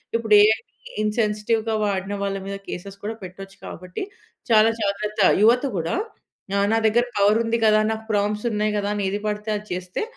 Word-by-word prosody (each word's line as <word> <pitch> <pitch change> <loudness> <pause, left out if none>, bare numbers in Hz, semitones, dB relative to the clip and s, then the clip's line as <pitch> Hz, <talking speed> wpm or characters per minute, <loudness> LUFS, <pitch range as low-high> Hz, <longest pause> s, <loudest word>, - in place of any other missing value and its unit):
ఇప్పుడు 225 -2 +1
ఏఐని 215 +1 +2 0.3
ఇన్‌సెన్సిటివ్‌గా 215 +1 0
వాడిన 195 0 -2
వాళ్ళ 195 0 -2
మీద 200 0 -4
కేసెస్ 195 +2 -7
కూడా 225 - -3
పెట్టొచ్చు 195 +2 -10
కాబట్టి, 180 - -7 0.5
చాలా 220 0 +6
జాగ్రత్త. 210 +1 -1 0.2
యువత 240 +4 +5
కూడా 165 - -1 0.7
ఆహ్, 200 - +2
నా 225 - +3
దగ్గర 240 +3 +2
పవరుంది 225 +3 +3
కదా, 215 0 +5
నాకు 220 0 -8
ప్రాంప్ట్స్ 210 +2 0
ఉన్నాయి 210 0 0
కదా, 205 0 -2
అని 200 -1 -1
ఏది 205 +1 -3
పడితే 210 +1 -3
అది 210 +1 -11
చేస్తే, 180 - -4
210 Hz, 165 wpm, -23 LUFS, 200-220 Hz, 0.7 s, చాలా